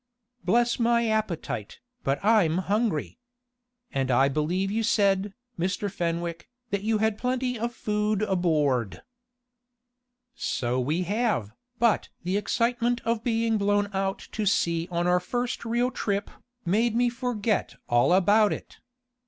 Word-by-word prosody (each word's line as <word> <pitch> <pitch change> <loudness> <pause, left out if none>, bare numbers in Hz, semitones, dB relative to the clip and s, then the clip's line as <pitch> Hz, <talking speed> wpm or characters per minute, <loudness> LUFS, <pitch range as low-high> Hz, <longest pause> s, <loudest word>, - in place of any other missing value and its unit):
Bless 235 +7 +2
my 235 0 +3
appetite, 190 - -2 0.2
but 135 +1 +1
I'm 200 -7 +4
hungry! 200 -1 -1 0.7
and 135 -1 -1
I 135 +2 +4
believe 175 +7 -1
you 225 +2 0
said, 200 -3 +2 0.2
Mr. 190 +3 -1
Fenwick, 170 0 -3 0.2
that 200 -1 0
you 220 +1 +1
had 220 0 0
plenty 250 -1 -1
of 235 +2 -1
food 210 -2 -1
aboard." 150 - 0 1.3
"So 125 - -1
we 155 +8 0
have, 205 - 0 0.3
but 235 -2 +2
the 180 +2 -1
excitement 235 +3 0
of 230 -1 0
being 225 -2 +1
blown 205 0 +1
out 195 0 -1
to 215 -1 -2
sea 170 -3 +1
on 175 -1 -1
our 180 0 +3
first 245 +7 -3
real 240 +2 +1
trip, 205 -4 -2 0.3
made 220 +6 +2
me 245 +1 +3
forget 235 -4 -1
all 120 +6 +3
about 205 +3 +4
it. - - -7
205 Hz, 135 wpm, -26 LUFS, 175-230 Hz, 1.3 s, I'm